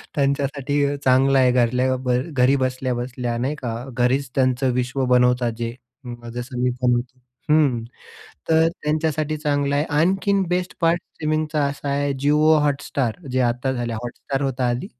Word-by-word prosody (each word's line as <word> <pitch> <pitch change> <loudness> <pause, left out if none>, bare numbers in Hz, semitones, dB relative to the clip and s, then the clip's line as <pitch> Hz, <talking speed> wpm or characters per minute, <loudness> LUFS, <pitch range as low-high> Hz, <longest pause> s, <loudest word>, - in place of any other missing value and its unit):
त्यांच्यासाठी 140 0 0 0.2
चांगला 135 +1 +4
आहे 125 -1 +4
घरल्या 125 +1 +2
बर 125 -1 0
घरी 130 0 +3
बसल्या-बसल्या 125 -2 -2
नाही 135 +5 -1
का? 120 -5 -4 0.2
घरीच 130 +2 +1
त्यांचं 130 -1 +2
विश्व 125 +1 -1
बनवतात 125 -1 +3
जे. 115 0 -4 0.6
जसं 125 +1 -5
मी 125 - +2
बनवतो. 125 +1 0 0.3
हं 140 -7 +3 0.7
तर 160 0 +4 0.2
त्यांच्यासाठी 155 0 -1
चांगला 145 -2 0
आहे. 145 +2 +1
आणखीन 190 +6 +2
बेस्ट 180 0 -1
पार्ट 170 +1 +2
स्ट्रीमिंगचा 155 -1 -2
असा 140 0 -4
आहे 140 0 0
जिओ 150 +2 +4
हॉटस्टार 140 -4 -1 0.2
जे 130 - 0
आता 125 +2 0
झालय. 120 -2 -3
हॉटस्टार 135 +3 -4
होत 135 -1 -2
आधी. 120 0 0
135 Hz, 145 wpm, -22 LUFS, 125-145 Hz, 0.7 s, चांगला